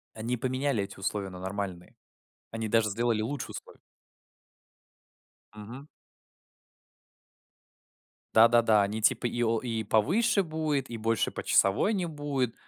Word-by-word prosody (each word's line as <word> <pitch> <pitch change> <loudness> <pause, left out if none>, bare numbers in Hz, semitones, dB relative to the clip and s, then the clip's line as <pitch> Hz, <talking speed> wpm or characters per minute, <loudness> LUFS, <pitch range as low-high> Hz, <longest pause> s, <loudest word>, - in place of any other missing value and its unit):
Они 115 +3 -2
поменяли 130 -2 -1
эти 100 0 -11
условия 100 0 -3
на 90 - -9
нормальные. 95 -2 -5 0.6
Они 115 -1 -4
даже 110 -1 +2
сделали 115 +1 0
лучше 135 +4 -4
условия. - - -10 1.8
Мгм. 115 +7 -10 2.5
Да-да-да, 115 -1 +5
они 105 +2 -2
типа 115 +3 +2
и 120 0 -2
о 115 -1 +1
и 115 -3 -3
повыше 195 - +2
будет, 155 -5 -2
и 120 - -5
больше 115 +1 0
почасовой 100 - +2
не 180 -3 -1
будет. 145 -6 -2
115 Hz, 120 wpm, -28 LUFS, 105-130 Hz, 2.5 s, Да-да-да